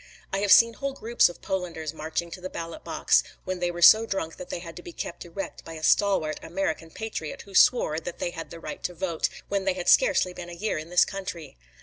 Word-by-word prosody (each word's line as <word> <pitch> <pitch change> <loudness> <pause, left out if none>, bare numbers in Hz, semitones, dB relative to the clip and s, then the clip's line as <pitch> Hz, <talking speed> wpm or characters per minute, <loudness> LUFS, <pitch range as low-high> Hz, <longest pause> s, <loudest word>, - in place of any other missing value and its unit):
I 195 - +1
have 200 0 +1
seen 230 0 +8
whole 275 +3 -4
groups 235 -6 +3
of 175 - -12
Polanders 165 -5 -3
marched 160 +2 -4
to 185 - -8
the 185 - -5
ballot 170 - -7
box, - - +3 0.2
when 185 -1 -3
they 175 0 0
were 175 0 -2
so 220 +5 +8
drunk 165 -6 -3
that 180 - -9
they - - -3
had 170 -1 -9
to - - -8
be 175 - -9
kept 170 - -6
erect 175 +3 -7
by 165 - -9
a 160 -1 -9
stalwart 190 -5 +2
American 165 -2 -3
patriot 210 -5 -6
who 200 - -15
swore 180 -7 +4
that 170 +1 -7
they 175 - -2
had 165 -1 -7
the 170 - -9
right - - -7
to 180 - -3
vote, 170 -2 -1 0.2
when 200 -1 -1
they 190 - +2
had 180 -1 -6
scarcely - - +4
been 175 -1 -8
a - - -8
year 175 -1 -2
in 155 +2 -8
this 180 0 +5
country. 190 -5 -7
175 Hz, 245 wpm, -26 LUFS, 165-195 Hz, 0.2 s, seen